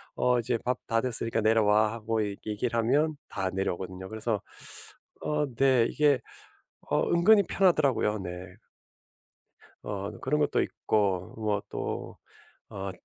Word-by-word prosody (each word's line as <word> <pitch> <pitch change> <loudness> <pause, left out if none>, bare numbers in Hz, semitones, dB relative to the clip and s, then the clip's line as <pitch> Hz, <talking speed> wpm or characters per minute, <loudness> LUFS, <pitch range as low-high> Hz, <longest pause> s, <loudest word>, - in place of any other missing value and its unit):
어 125 -1 +2
"이제 115 +1 0
밥 125 - 0
다 115 -1 +2
됐으니까 115 -2 0
내려와." 110 -1 +4
하고 110 -1 -1
얘 100 - -5
얘기를 110 +3 -2
하면 145 +7 +2
다 95 -1 -2
내려오거든요. 95 0 -3
그래서 110 -1 -2 0.8
어 150 0 0
네 130 -1 +4
어 - - +2
이게 145 +1 +3 0.9
은근히 200 +5 +6
편하더라고요. 140 - +2
네. 90 0 -7 1.3
어. 100 0 -4
그런 150 +3 0
것도 145 - +2
있고 95 -4 -1
뭐 105 -2 0
또 - - -5 0.5
어 95 -1 -5
110 Hz, 255 characters per minute, -28 LUFS, 100-130 Hz, 1.3 s, 은근히